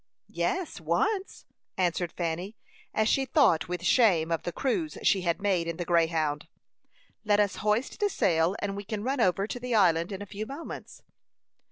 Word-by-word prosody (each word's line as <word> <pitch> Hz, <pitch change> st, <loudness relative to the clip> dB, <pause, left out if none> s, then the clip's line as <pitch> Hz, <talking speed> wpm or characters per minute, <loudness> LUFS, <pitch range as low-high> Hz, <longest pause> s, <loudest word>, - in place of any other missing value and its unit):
"Yes, 375 Hz, -3 st, -2 dB
once," 425 Hz, -3 st, -1 dB, 0.3 s
answered 175 Hz, -2 st, 0 dB
Fanny, 175 Hz, +5 st, -4 dB, 0.3 s
and 215 Hz, 0 st, +1 dB
she 270 Hz, -, +2 dB
thought 250 Hz, -, +3 dB
with 175 Hz, 0 st, -4 dB
shame 170 Hz, -5 st, +4 dB
of 165 Hz, -2 st, 0 dB
the 175 Hz, -, -4 dB
cruise 305 Hz, -, -2 dB
she 195 Hz, -, +3 dB
had 170 Hz, 0 st, 0 dB
made 190 Hz, -4 st, 0 dB
in 170 Hz, -1 st, -3 dB
the 175 Hz, -, -3 dB
Greyhound. 165 Hz, -3 st, +1 dB, 0.8 s
"Let 210 Hz, -1 st, +3 dB
us 205 Hz, -2 st, +1 dB
hoist 215 Hz, -, 0 dB
the 415 Hz, -1 st, +2 dB
sail, 170 Hz, -, +2 dB
and 200 Hz, -1 st, -2 dB
we 200 Hz, -, -5 dB
can 210 Hz, 0 st, -4 dB
run 265 Hz, +1 st, 0 dB
over 195 Hz, 0 st, +2 dB
to 245 Hz, -, -5 dB
the 245 Hz, -1 st, -2 dB
island 170 Hz, -3 st, +3 dB
in 195 Hz, +1 st, -5 dB
a -, -, -8 dB
few 210 Hz, +2 st, -6 dB
moments." 285 Hz, +6 st, -8 dB
195 Hz, 180 wpm, -28 LUFS, 170-230 Hz, 0.8 s, shame